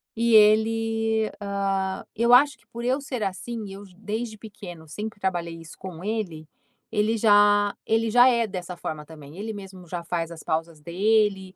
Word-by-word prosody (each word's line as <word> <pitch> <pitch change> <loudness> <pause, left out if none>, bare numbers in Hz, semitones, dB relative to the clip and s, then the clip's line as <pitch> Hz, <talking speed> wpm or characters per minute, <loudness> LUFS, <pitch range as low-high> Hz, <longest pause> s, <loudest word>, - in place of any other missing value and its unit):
E 230 0 +3
ele, 220 +1 +3
hã, 195 -1 -1
eu 235 +2 +3
acho 270 +1 +6
que - - -30
por 235 +1 -8
eu 260 +3 +1
ser 255 -5 -4
assim, 215 +4 -4
eu, 200 - -9
desde 220 +2 -4
pequeno, 180 -7 -10
sempre 210 +6 -6
trabalhei 175 -3 -2
isso 165 -2 -11
com 180 -3 -8
ele, 195 -8 -3 0.4
ele 220 +1 +1
já 205 -1 +5
ele 225 0 +1
já 245 +2 +7
é 235 -2 +2
dessa 180 -3 -6
forma, 155 -2 -5
também, 150 +1 -12
ele 220 +2 -4
mesmo 190 -3 -10
já 170 0 -5
faz 170 -1 -2
as 170 -2 -10
pausas 160 0 -2
dele. 195 +3 +1
205 Hz, 170 wpm, -25 LUFS, 175-225 Hz, 0.4 s, já